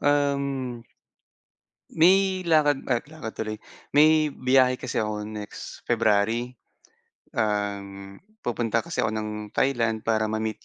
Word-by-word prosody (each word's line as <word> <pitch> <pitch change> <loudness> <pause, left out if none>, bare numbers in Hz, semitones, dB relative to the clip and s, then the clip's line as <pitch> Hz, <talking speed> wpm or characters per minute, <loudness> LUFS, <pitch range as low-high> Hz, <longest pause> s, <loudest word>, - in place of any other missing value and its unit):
um, 140 -4 0 1.1
may 185 +2 +4
lakad, 150 -4 +3
ah, 120 -3 +2
lakad 155 -8 -7
tuloy. 110 -1 -3 0.4
May 155 +1 +6
biyahe 130 0 +3
kasi - - -3
ako 105 -1 -2
next 105 -1 -8
February. 115 +1 +2 0.8
Um, 100 -2 -3 0.2
pupunta 115 -2 0
kasi - - -2
ako 110 - +1
ng 110 0 -3 0.3
Thailand 115 -5 +1
para 110 -1 +1
ma-meet 110 0 -3
115 Hz, 115 wpm, -25 LUFS, 110-140 Hz, 1.1 s, May